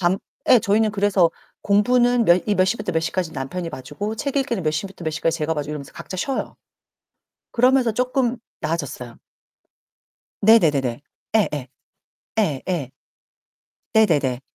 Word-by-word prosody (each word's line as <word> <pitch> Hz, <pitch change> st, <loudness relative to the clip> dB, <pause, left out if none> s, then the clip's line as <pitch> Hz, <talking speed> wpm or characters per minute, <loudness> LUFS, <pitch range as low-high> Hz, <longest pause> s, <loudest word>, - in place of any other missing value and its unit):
밤 180 Hz, +1 st, +2 dB, 0.3 s
예, 250 Hz, -, +8 dB
저희는 215 Hz, 0 st, +2 dB
그래서 200 Hz, -4 st, +3 dB, 0.3 s
공부는 240 Hz, +4 st, +3 dB
몇 175 Hz, -1 st, +5 dB
이 210 Hz, -, +3 dB
몇 185 Hz, -, +4 dB
시부터 210 Hz, +3 st, -1 dB
몇 160 Hz, -, +1 dB
시까지 165 Hz, 0 st, -2 dB
남편이 160 Hz, +6 st, -4 dB
봐주고 150 Hz, +11 st, -5 dB
책 280 Hz, +4 st, -3 dB
읽기는 260 Hz, -8 st, 0 dB
몇 155 Hz, -, +1 dB
시부터 185 Hz, +3 st, -5 dB
몇 160 Hz, -, 0 dB
시까지 165 Hz, +1 st, -1 dB
제가 160 Hz, +1 st, -1 dB
봐주고 150 Hz, -1 st, -4 dB
이러면서 140 Hz, -3 st, -7 dB
각자 185 Hz, -, -8 dB
쉬어요. 265 Hz, +8 st, -3 dB, 1.0 s
그러면서 250 Hz, -1 st, +3 dB
쪼끔 250 Hz, +1 st, 0 dB, 0.2 s
나아졌어요. 145 Hz, -7 st, -4 dB, 1.3 s
네네네네. 150 Hz, -, +4 dB, 0.3 s
예예. 150 Hz, -10 st, +1 dB, 0.8 s
예예. 155 Hz, -, -1 dB, 1.0 s
네네네. 150 Hz, -, +3 dB
185 Hz, 310 characters per minute, -22 LUFS, 155-220 Hz, 1.3 s, 예